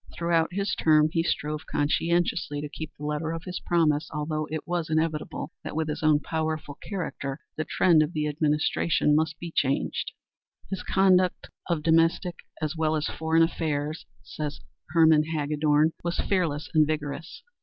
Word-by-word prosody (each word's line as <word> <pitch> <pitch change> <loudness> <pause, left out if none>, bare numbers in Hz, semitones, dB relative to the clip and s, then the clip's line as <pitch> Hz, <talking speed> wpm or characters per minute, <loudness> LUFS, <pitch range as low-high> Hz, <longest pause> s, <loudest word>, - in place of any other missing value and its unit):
Throughout 170 -1 +1
his 200 +2 -1
term 155 -1 +4
he 165 - +1
strove 150 -2 -2
conscientiously 165 0 0
to 150 0 -5
keep 155 +1 -6
the 150 - -7
letter 150 +2 -2
of 165 0 -5
his 180 -1 -5
promise, 155 -3 +2
although 155 0 -2
it 155 -1 -5
was 170 -2 -2
inevitable 155 -1 -1
that - - -6
with 160 0 0
his 150 - -3
own 155 -1 +4
powerful 155 -2 -3
character 155 -8 -4 0.2
the 155 - -2
trend 170 -4 +4
of 155 +1 0
the 150 -1 -1
administration 150 0 +1
must 155 0 +1
be 170 -1 -7
changed. 135 -1 0 0.6
"His 190 -1 -2
conduct 185 -2 +2 0.2
of 165 -3 0
domestic 165 +2 +2 0.2
as 155 0 -2
well 160 -1 +1
as 155 0 -1
foreign 160 +1 +2
affairs," 155 -2 -2 0.2
says 150 -2 -5 0.3
Herman 160 -1 +5
Hagedorn, 150 +1 +2
"was 170 0 -2
fearless 165 -7 0
and 155 -2 +5
vigorous. 155 +1 -4
155 Hz, 160 wpm, -27 LUFS, 150-165 Hz, 0.6 s, Herman